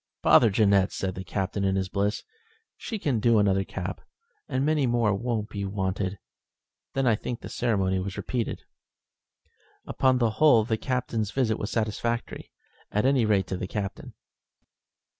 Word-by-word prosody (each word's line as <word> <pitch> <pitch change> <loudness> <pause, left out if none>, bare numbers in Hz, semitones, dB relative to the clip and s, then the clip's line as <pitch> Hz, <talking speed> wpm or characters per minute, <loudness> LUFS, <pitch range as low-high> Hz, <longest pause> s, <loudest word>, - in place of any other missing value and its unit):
"Bother 115 - +6
Jeannette," 100 -2 +3
said 95 -1 -3
the 95 - -6
Captain 95 +2 -2
in 95 0 +1
his 95 -1 0
bliss. 100 +2 -1 0.5
"She 225 - -5
can 140 - 0
do 115 0 +4
another 95 -2 +3
cap, 90 -1 -5 0.5
and 130 +2 0
many 150 -3 +2
more 120 -3 +2
won't 115 0 -2
be 100 -2 -4
wanted." 95 0 -2 0.8
Then 135 0 +1
I 120 - +4
think 115 +2 -4
the - - -8
ceremony 95 -6 0
was 95 +1 -5
repeated. 120 -3 -3 1.2
Upon 130 -1 +2
the 120 -3 +2
whole 120 -1 +5
the 110 - 0
Captain's 115 -3 -2
visit 115 -2 0
was 100 - -3
satisfactory 115 +2 -2 0.4
at 105 +4 +1
any 135 -3 +3
rate 100 -3 +2
to 95 - -4
the 90 - -4
Captain. 100 0 -5
105 Hz, 160 wpm, -26 LUFS, 95-120 Hz, 1.2 s, Bother